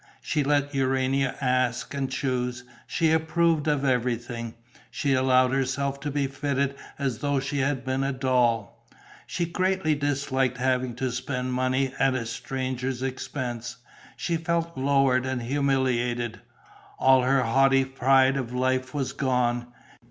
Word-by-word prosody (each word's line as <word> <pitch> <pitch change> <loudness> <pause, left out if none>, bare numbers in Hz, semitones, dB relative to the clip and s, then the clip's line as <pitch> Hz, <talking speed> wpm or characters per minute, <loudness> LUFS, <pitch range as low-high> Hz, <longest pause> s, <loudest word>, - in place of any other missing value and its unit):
She 150 -2 -1
let 145 0 +1
Urania 135 0 +1
ask 125 -1 0
and 135 -2 -2
choose; 125 -2 -2 0.2
she 160 -1 +1
approved 160 -1 +2
of 145 -2 +1
everything. 120 -2 -1 0.3
She 140 -2 0
allowed 130 -1 +4
herself 135 +1 -1
to 145 +1 -4
be 145 0 0
fitted 140 0 -1 0.2
as 135 -5 -2
though 145 -1 0
she 140 +1 -3
had 135 -2 0
been 130 +1 0
a 135 - 0
doll. 125 -5 0 0.4
She 175 - -1
greatly 185 -1 0
disliked 135 -3 0
having 130 -1 0
to 130 0 -2
spend 125 +1 -3
money 130 +1 0
at 135 -1 +3
a 120 -2 -2
stranger's 130 +2 -3
expense. 125 -3 -4 0.4
She 170 -1 -1
felt 170 0 -1
lowered 130 -1 +2
and 130 -2 -2
humiliated: 125 -3 0 0.6
all 130 0 +5
her 130 +1 +2
haughty 135 +2 +4
pride 135 +1 +3
of 125 -3 -3
life 130 +1 0
was 135 -2 -2
gone. 125 -3 0
130 Hz, 140 wpm, -26 LUFS, 125-140 Hz, 0.6 s, all